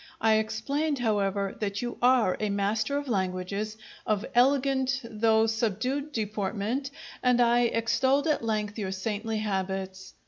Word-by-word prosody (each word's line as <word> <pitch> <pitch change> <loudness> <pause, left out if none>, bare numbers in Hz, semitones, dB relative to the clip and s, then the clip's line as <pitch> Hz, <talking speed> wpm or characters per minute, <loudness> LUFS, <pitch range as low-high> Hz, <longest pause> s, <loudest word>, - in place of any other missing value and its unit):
I 220 -1 +4
explained, 280 +8 -1
however, 200 -4 0
that 200 +1 -2
you 240 - -4
are 245 -6 +4
a 215 - -1
master 215 +6 0
of 285 0 -4
languages, 200 +1 -2 0.3
of 215 +1 0
elegant 270 +1 +3
though 220 0 +2
subdued 230 +6 -1
deportment, 215 +3 -2 0.3
and 250 -1 +3
I 240 0 +4
extolled 260 +5 +1
at 305 -6 +1
length 215 -1 -2
your 190 -2 -2
saintly 215 +3 -3
habits. 190 -2 -3
220 Hz, 135 wpm, -28 LUFS, 200-250 Hz, 0.3 s, I